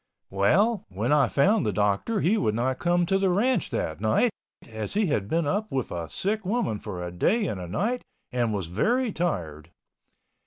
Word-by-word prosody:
Well, 185 - +2
when 105 +7 -2
I 145 -2 +4
found 200 +9 +3
the 105 - 0
doctor 105 - 0
he 190 +7 +3
would 110 - 0
not 130 +3 -1
come 175 0 +2
to 195 +3 +1
the 195 -1 +2
ranch 210 - +1
that 80 +4 -3
night, 110 - +3 0.4
as 110 - -6
he 215 0 +3
had 125 - 0
been 165 +6 0
up 205 +8 -1
with 130 -3 -2
a 85 -2 -4
sick 210 - -1
woman 195 - -1
for 95 -5 -6
a 90 - -5
day 205 - +1
and 100 - -3
a 90 - -6
night 225 - -1 0.3
and 120 -3 0
was 100 -4 -2
very 225 - +1
tired. 85 - -3
145 Hz, 195 wpm, -26 LUFS, -, 0.4 s, I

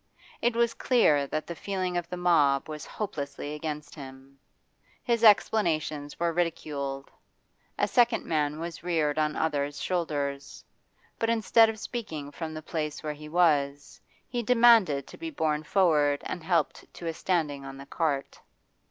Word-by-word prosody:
It 240 0 +1
was 235 0 +2
clear 150 - +3
that 155 +2 -3
the 170 - -5
feeling 185 0 -3
of 175 -1 -2
the 180 - -4
mob 150 -6 +3
was 155 -1 -7
hopelessly 145 -8 -5
against 150 -1 -5
him; 135 -1 -12 0.6
his 235 -1 0
explanations 155 -9 +3
were 170 0 +1
ridiculed. 145 -5 -3 0.7
A - - +2
second 240 -2 +3
man 150 -1 0
was 165 -1 -6
reared 155 -3 0
on 150 0 0
others' 145 -2 -1
shoulders; 145 -6 -3 0.5
but 225 - 0
instead 225 0 +4
of 220 - -4
speaking 165 - -6
from 160 +1 -6
the 155 - -7
place 150 -2 -4
where 150 -1 -2
he 150 +1 -11
was, 145 -4 +1 0.3
he 245 -1 -2
demanded 230 - +5
to - - -13
be 330 - -4
borne 155 - -1
forward 150 -4 +2
and 175 - -5
helped 165 -3 -1
to 170 - -9
a 165 - -1
standing 155 -6 -1
on 135 0 -8
the 135 - -10
cart. 145 -2 -2
155 Hz, 155 wpm, -28 LUFS, 145-185 Hz, 0.7 s, demanded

